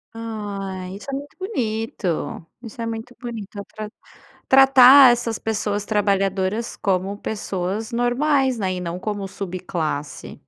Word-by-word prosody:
Ai! 200 -4 -5
Isso 210 - -13
é - - -4
muito 285 +1 -6
bonito! 220 - -3 0.2
Isso 230 0 -11
é - - -2
muito 230 +2 -6
bonito, 225 -4 -7
atra 210 +1 -7 0.6
tratar 270 0 +9
essas 230 -2 -3
pessoas 210 -2 -2
trabalhadoras 200 +1 0
como 195 +1 -1
pessoas 205 +1 -4
normais, 260 +2 +2
né, 190 -3 -1
e 180 - -4
não 175 +1 -4
como 205 -1 -3
subclasse. 180 -6 -4
210 Hz, 125 wpm, -22 LUFS, 195-240 Hz, 0.6 s, tratar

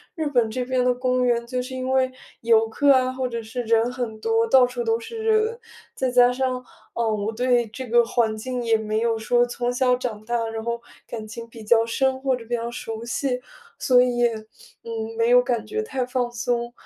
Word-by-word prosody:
日 315 -2 -2
本 245 -5 +2
这 250 +3 -2
边 255 -1 +1
的 250 - +4
公 255 0 0
园 235 -1 +1
就 250 +1 -2
是 255 +1 -7
因 255 0 -3
为 260 -1 +2 0.3
游 225 -1 +4
客 285 +5 +3
啊， 255 0 +2
或 260 0 -2
者 235 -1 -4
是 225 +3 -5
人 230 +1 +2
很 240 -4 -4
多， 225 +1 +2
到 255 +2 +6
处 245 -1 -4
都 225 0 +1
是 455 - -8
人。 440 +1 +2 0.4
再 260 -1 -1
加 245 0 +6
上， 255 0 -2 0.3
啊， 235 -1 0
我 215 0 -1
对 245 0 +2
这 250 +3 -7
个 235 +1 +4
环 225 -2 0
境 250 +3 -4
也 230 -1 +3
没 215 0 -2
有 230 0 +1
说 240 +2 +2
从 245 0 -2
小 250 0 +3
长 240 -4 -5
大， 235 0 -1
然 225 0 -5
后 235 +1 -2 0.3
感 220 -2 -6
情 230 +2 -8
比 230 -1 -11
较 225 +1 +4
深， 265 +3 0
或 265 -1 +1
者 240 -2 -10
比 240 - -6
较 235 0 -3
熟 225 -1 -6
悉。 250 +1 -2 0.4
所 250 -1 +4
以 250 -1 +1
也， 240 -1 +3 0.5
嗯， 225 -1 -5
没 230 +1 +2
有 250 0 +7
感 240 -3 -2
觉 435 0 -2
太 265 - -2
放 250 -1 -1
松。 240 0 -2
240 Hz, 240 characters per minute, -23 LUFS, 230-255 Hz, 0.5 s, 有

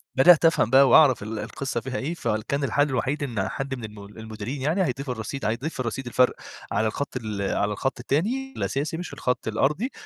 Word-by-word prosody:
بدأت 165 +5 +7
أفهم 165 -8 +3
بقى 135 +1 +6
وأعرف 135 -9 +6
ال 110 0 -5
القصة 120 +3 -3
فيها 130 0 -4
إيه، 155 +6 -2
فكان 120 +1 -2
الحل 145 +1 +2
الوحيد 135 +3 -1
إن 105 -8 -2
حد 135 0 -4
من 125 - -9
الم 105 -1 -8
المديرين 110 +5 -7
يعني 160 +8 +1
هيضيف 135 -3 -3
الرصيد 125 +3 -4
هيضيف 125 +7 -2
الرصيد 125 +2 -3
الفرق 125 +1 +3 0.4
على 110 - +1
الخط 135 +3 -3
ال 110 -4 -4
على 100 +1 0
الخط 130 +4 -2
التاني 235 - -1
الأساسي 150 +4 -2
مش 175 - -6
الخط 125 -2 -2
الأرضي، 150 - 0
130 Hz, 190 wpm, -25 LUFS, 110-145 Hz, 0.4 s, بدأت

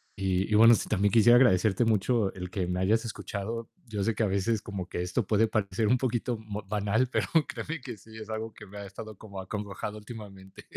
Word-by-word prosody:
y 95 +1 0
y - - +4
bueno, 115 +2 +8
sí, - - -3
también 100 -1 +2
quisiera 120 +1 +7
agradecerte 110 -4 +4
mucho 110 -1 +2
el 90 -1 -6
que 95 -5 -2
me 90 0 -1
hayas 110 +5 +2
escuchado. 115 +1 -5 0.2
Yo 105 -3 -2
sé 115 - +1
que 105 - -3
a - - +3
veces 100 +3 0
como 100 -3 -5
que 90 - -4
esto 90 0 -1
puede 110 +1 +3
parecer 105 0 0
un 125 - +4
poquito 120 -1 -1
mo 105 -1 -6
banal, 105 +4 +1
pero - - 0 0.2
créeme 160 0 -5
que, 125 -4 -7
sí 110 +3 -15
es 110 -1 -9
algo 110 0 -4
que 105 - -12
me 100 - -11
ha 100 - -6
estado 105 +1 -9
como 100 -3 -9
acongojado 105 +2 -5
últimamente. 105 -3 -11
105 Hz, 225 wpm, -28 LUFS, 95-115 Hz, 0.2 s, bueno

